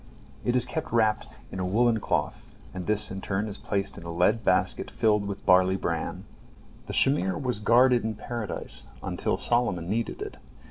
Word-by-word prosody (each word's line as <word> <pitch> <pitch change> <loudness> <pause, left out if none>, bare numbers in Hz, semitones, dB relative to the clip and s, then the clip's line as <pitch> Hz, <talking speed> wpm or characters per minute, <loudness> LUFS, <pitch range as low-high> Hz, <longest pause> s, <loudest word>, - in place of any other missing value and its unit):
It 120 - 0
is 125 - +4
kept 160 - -5
wrapped 110 - +2
up 65 - -19 0.2
in 95 - -6
a - - -1
woollen 115 +3 +2
cloth, - - -2 0.2
and 90 -1 -6
this 105 -1 +4
in 95 0 -5
turn 100 +3 -2
is 100 -1 -6
placed 100 -1 -2
in - - -12
a 85 - -6
lead 90 +7 +2
basket - - +1
filled 105 -2 +1
with 100 0 -6
barley 95 0 +5
bran. 95 - -3 0.6
The - - -5
shamir 95 -9 +2
was 125 -6 -2
guarded 120 +3 +4
in 110 0 -2
Paradise 110 -1 -4 0.2
until - - -1
Solomon 95 -8 0
needed 115 - -2
it. 420 - -8
105 Hz, 185 wpm, -27 LUFS, 95-120 Hz, 0.6 s, barley